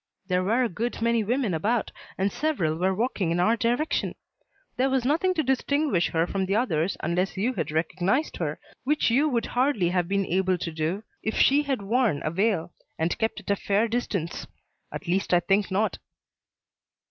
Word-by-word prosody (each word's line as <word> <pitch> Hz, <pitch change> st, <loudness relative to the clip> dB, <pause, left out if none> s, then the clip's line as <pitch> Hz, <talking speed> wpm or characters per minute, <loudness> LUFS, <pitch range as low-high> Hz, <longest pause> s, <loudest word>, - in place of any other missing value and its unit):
There 180 Hz, 0 st, +2 dB
were 230 Hz, +7 st, +2 dB
a -, -, +2 dB
good 230 Hz, +5 st, -3 dB
many 230 Hz, -1 st, +2 dB
women 235 Hz, -2 st, 0 dB
about 210 Hz, +8 st, 0 dB, 0.3 s
and 195 Hz, +1 st, +1 dB
several 270 Hz, -, 0 dB
were 185 Hz, +3 st, +1 dB
walking 210 Hz, -5 st, -1 dB
in 170 Hz, +1 st, 0 dB
our 215 Hz, +6 st, +4 dB
direction. 240 Hz, +7 st, 0 dB, 0.6 s
There 260 Hz, +2 st, +2 dB
was 260 Hz, -2 st, +1 dB
nothing 340 Hz, +7 st, +2 dB
to 315 Hz, -, +1 dB
distinguish 265 Hz, -, +1 dB
her 165 Hz, 0 st, +1 dB
from 190 Hz, +1 st, -2 dB
the 195 Hz, -, +1 dB
others 190 Hz, -7 st, 0 dB
unless 180 Hz, +3 st, -1 dB
you 230 Hz, +7 st, 0 dB
had -, -, -3 dB
recognized 180 Hz, -, 0 dB
her, -, -, -3 dB, 0.2 s
which 295 Hz, -2 st, +2 dB
you 285 Hz, +6 st, +3 dB
would 235 Hz, -5 st, 0 dB
hardly 245 Hz, -8 st, +1 dB
have 180 Hz, -1 st, 0 dB
been 200 Hz, +1 st, 0 dB
able 185 Hz, +1 st, +1 dB
to 170 Hz, -, -4 dB
do 160 Hz, +6 st, -2 dB, 0.2 s
if 220 Hz, -, -2 dB
she 280 Hz, +2 st, +5 dB
had 270 Hz, -7 st, -2 dB
worn 225 Hz, -, +1 dB
a 155 Hz, -, 0 dB
veil 190 Hz, -2 st, 0 dB, 0.2 s
and 165 Hz, +2 st, 0 dB
kept 225 Hz, 0 st, -1 dB
at -, -, -3 dB
a -, -, +3 dB
fair 205 Hz, +3 st, +1 dB
distance. 210 Hz, -8 st, -3 dB, 0.4 s
At 190 Hz, -, -7 dB
least 185 Hz, +1 st, +1 dB
I -, -, +5 dB
think 195 Hz, +3 st, +1 dB
not." 205 Hz, +3 st, 0 dB
205 Hz, 190 wpm, -26 LUFS, 180-245 Hz, 0.6 s, she